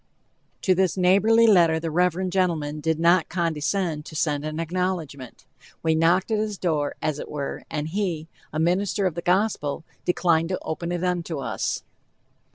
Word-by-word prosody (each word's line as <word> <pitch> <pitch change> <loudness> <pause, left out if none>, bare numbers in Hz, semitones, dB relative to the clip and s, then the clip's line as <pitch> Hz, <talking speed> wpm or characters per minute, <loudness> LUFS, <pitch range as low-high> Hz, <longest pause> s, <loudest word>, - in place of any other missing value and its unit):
To 185 - +4
this 185 0 +1
neighborly 200 +5 +5
letter 170 -7 +5
the 165 0 -3
reverend 180 +2 +1
gentleman 165 -5 0
did 160 +1 -1
not 170 0 +4
condescend 165 -1 -1
to 155 - -10
send 145 -2 0
an 155 +1 -4
acknowledgment. 165 -6 -3 0.4
We 160 -1 +3
knocked 170 +6 +2
at 215 - +2
his 210 -2 -2
door, 155 -5 -1
as 150 -1 -1
it - - -7
were, 145 -2 -5
and 150 -1 -3
he, 170 -3 -2 0.2
a - - -4
minister 185 +4 +1
of 185 - +1
the 170 - -4
Gospel, 180 -5 0 0.2
declined 170 -2 +2
to 185 - -2
open 170 +2 -4
it 175 0 -2
unto 175 -3 -1
us. 135 - -2
170 Hz, 165 wpm, -24 LUFS, 155-185 Hz, 0.4 s, neighborly